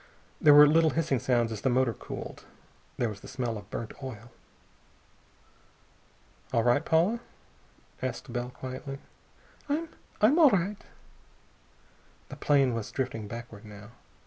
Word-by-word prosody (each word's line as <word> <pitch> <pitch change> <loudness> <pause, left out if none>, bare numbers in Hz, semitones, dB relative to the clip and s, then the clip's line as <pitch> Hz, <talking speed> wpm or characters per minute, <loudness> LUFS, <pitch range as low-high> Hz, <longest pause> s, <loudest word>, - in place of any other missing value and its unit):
There 150 -1 +8
were 145 0 +10
little 160 +2 +4
hissing 155 -5 0
sounds 120 -1 +1
as 110 - -5
the 130 - +1
motor 125 -1 +2
cooled. - - -8 0.5
There 120 - +1
was 105 -3 -6
the - - -11
smell 125 -3 -3
of 105 - -9
burnt 115 - -5
oil. 120 -2 -8 2.2
"All 115 - +2
right, 120 +5 +3
Paula?" 175 +10 +2 0.8
asked 125 -1 -4
Bell 120 0 -2
quietly. 130 +2 -7 0.7
"I 315 +3 0 0.3
I'm 255 +11 +5
all 310 -4 +8
right." 200 -1 -1 1.5
The - - -7
plane 140 -4 +3
was 115 -2 -4
drifting 120 -5 -3
backward, 115 -2 -9
now. 105 0 -12
130 Hz, 135 wpm, -29 LUFS, 115-155 Hz, 2.2 s, were